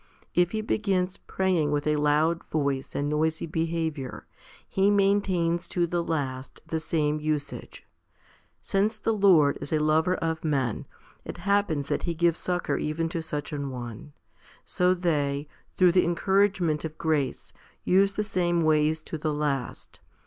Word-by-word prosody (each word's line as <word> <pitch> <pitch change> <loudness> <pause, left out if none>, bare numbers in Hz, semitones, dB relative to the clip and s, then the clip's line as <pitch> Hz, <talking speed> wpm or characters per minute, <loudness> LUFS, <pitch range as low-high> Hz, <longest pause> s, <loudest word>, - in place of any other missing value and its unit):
If 175 0 +3
he 215 +2 -2
begins 195 -4 0
praying 185 -6 0
with 145 0 -1
a 150 0 +2
loud 150 +3 +2
voice 140 -3 -2
and 145 - -1
noisy 155 +2 0
behaviour, 160 -4 -3 0.4
he 195 +1 +2
maintains 195 -4 +2
to 175 -1 0
the 170 0 -1
last 135 -5 -3
the 160 - -2
same 155 -1 0
usage. 150 -2 -4 0.8
Since 210 +3 0
the 225 - 0
Lord 180 -9 +4
is - - -6
a 155 - +3
lover 155 +4 +2
of 160 -2 -2
men, 135 -8 -1 0.4
it - - -7
happens 185 -7 0
that - - 0
He 170 -2 -2
gives 170 0 +2
succour 180 -1 -1
even 165 +2 -1
to 165 0 -3
such 150 -1 -5
an 140 -1 -3
one; 125 +2 -8 0.5
so 180 +1 +2
they, 145 -5 -1 0.3
through 180 -2 +5
the 180 +1 +4
encouragement 180 -2 +1
of 160 -1 -6
grace, 150 -5 -1 0.3
use 195 +2 +3
the 210 - -1
same 175 -4 0
ways 155 0 +2
to 160 - -6
the 155 0 -1
last. 145 -4 -3
160 Hz, 155 wpm, -27 LUFS, 150-180 Hz, 0.8 s, through